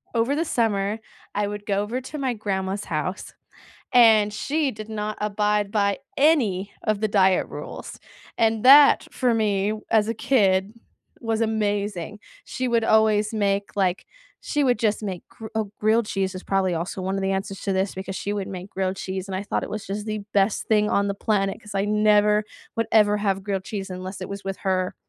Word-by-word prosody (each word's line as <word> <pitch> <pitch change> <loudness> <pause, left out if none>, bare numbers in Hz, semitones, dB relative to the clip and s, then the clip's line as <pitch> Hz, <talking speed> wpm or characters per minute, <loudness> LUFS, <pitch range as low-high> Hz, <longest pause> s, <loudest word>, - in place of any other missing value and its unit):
over 235 +5 +2
the 330 +2 0
summer 215 -4 0 0.3
I 205 0 0
would 205 0 -6
go 200 -2 0
over 230 +5 -3
to 280 +4 -8
my 260 -3 -1
grandma's 195 -1 -3
house 170 +5 -4 0.6
and 220 -4 +6
she 290 +7 -1
did 215 -3 -8
not 215 -1 -4
abide 210 -1 0
by 200 -2 +1 0.2
any 225 - +2
of 215 -2 0
the 215 - +2
diet 190 -2 +3
rules. - - -8 0.4
And 225 -1 +2
that, 280 +2 +8
for 250 -2 +1
me 210 -2 +1 0.2
as 215 -1 +3
a 230 - 0
kid, 200 -4 +2 0.5
was 225 -1 -1
amazing. 205 -3 -1 0.3
She 255 -1 -3
would 235 -1 +2
always 220 -1 +3
make, 200 -2 -1
like 190 -2 0 0.4
she 295 -1 0
would 245 -4 +2
just 215 -1 0
make 190 -4 -5
gr 225 - -10
oh, 220 -2 -1
grilled 220 +1 +3
cheese 195 -2 -2
is 185 - -8
probably 190 -2 +1
also 170 +3 -3
one 190 +1 -2
of 195 - -2
the 195 0 0
answers 195 0 -4
to 195 - -1
this 190 +1 0
because 190 0 -6
she 205 - -3
would 200 -2 -3
make 185 0 -7
grilled 190 -1 -2
cheese 190 0 -5
and 190 - -4
I 190 - -3
thought - - -2
it - - -6
was 215 0 -5
just 205 +2 -4
the 215 -1 -3
best 200 +1 +2
thing 210 -1 +3
on 200 0 +2
the 200 - 0
planet 195 -1 -1
'cause 210 -2 -10
I 195 - +1
never 210 0 +3 0.3
would 230 - 0
ever 210 -1 +4
have 195 -2 -1
grilled 195 -2 -3
cheese 195 -2 -5
unless 185 +1 -7
it 185 - -5
was 200 0 -6
with 195 0 -3
her. 185 -1 -1
205 Hz, 200 wpm, -24 LUFS, 195-220 Hz, 0.6 s, that